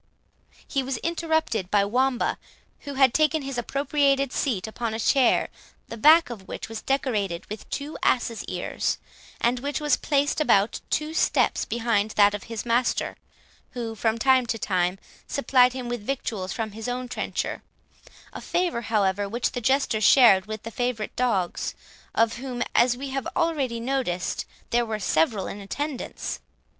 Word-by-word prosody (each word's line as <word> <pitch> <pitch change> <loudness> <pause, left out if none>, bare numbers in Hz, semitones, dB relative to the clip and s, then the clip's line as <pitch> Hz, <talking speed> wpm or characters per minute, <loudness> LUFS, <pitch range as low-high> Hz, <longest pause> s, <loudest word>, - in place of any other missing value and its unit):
He 275 - 0
was 260 -1 -3
interrupted 320 - 0
by 200 -1 +3
Wamba, 250 +4 +1 0.4
who 285 -1 -7
had 265 -2 +5
taken 310 -1 +2
his 270 -2 -3
appropriated 275 +1 +1
seat 230 -10 -1
upon 220 0 -3
a - - -4
chair, 250 +2 +3 0.4
the - - -5
back 310 +5 +6
of 195 -5 -9
which - - -6
was 225 -1 -6
decorated 215 -10 -1
with 215 - -7
two 290 +2 -5
ass's 235 -2 +1
ears, - - -2 0.4
and 245 +1 +1
which 285 +3 -2
was 295 -3 +2
placed 290 +1 +1
about 205 -7 +3
two 305 +1 -1
steps - - +2
behind 225 -3 0
that 205 0 +6
of 205 - -5
his 230 -1 -5
master, 240 +1 +1 0.6
who, 235 -2 -4
from 225 +1 0
time 260 +1 +3
to 225 - -1
time, 185 -3 0 0.3
supplied 255 -3 +3
him 255 -2 -5
with 240 -2 -3
victuals 210 -6 -3
from 220 0 -3
his 220 +2 -7
own 250 +1 -3
trencher; - - -3 0.7
a - - -7
favour, 350 -9 -1
however, 205 -3 0
which 235 +3 -1
the 245 - -4
Jester 265 -3 +1
shared 210 -5 +6
with 215 -1 -6
the 230 - -6
favourite 245 -3 -2
dogs, 205 -8 -1 0.4
of 230 0 +2
whom, 245 -1 -3
as 245 0 +4
we 275 +1 -5
have 270 0 -3
already 290 -9 0
noticed, 235 -8 -2 0.3
there 240 0 +3
were 220 -2 -3
several 190 +1 +1
in 205 - -6
attendance. 280 +7 -4
240 Hz, 160 wpm, -25 LUFS, 215-270 Hz, 0.7 s, back